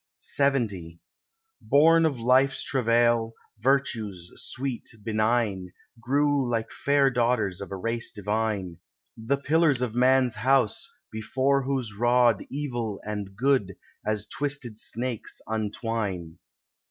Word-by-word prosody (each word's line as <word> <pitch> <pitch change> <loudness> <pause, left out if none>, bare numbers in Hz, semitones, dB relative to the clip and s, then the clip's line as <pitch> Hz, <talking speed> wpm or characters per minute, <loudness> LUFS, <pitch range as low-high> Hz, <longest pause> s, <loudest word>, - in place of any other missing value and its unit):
LXX 110 -12 0 0.6
Born 165 +3 +5
of 140 -6 -3
life's 130 +3 +3
travail, 115 -2 +2 0.2
Virtues, 110 -8 0
sweet, 130 -1 -4
benign, 110 -4 0 0.3
Grew 140 +2 +1
like 115 -2 -2
fair 140 -1 +2
daughters 115 -6 0
of 100 - -7
a - - -3
race 115 +4 -3
divine— 105 -4 -2 0.4
The 115 +5 -1
pillars 145 -2 +2
of 120 -3 -2
Man's 130 0 +3
house, 125 0 +1 0.2
before 130 +5 0
whose 130 -6 -2
rod 120 0 +3
Evil 120 -7 -3
and 105 -2 -5
Good, 125 -6 +1 0.3
as 105 -1 -1
twisted 135 -3 -4
snakes, 120 +1 -2
untwine. 105 -5 -3
120 Hz, 110 wpm, -26 LUFS, 105-135 Hz, 0.6 s, Born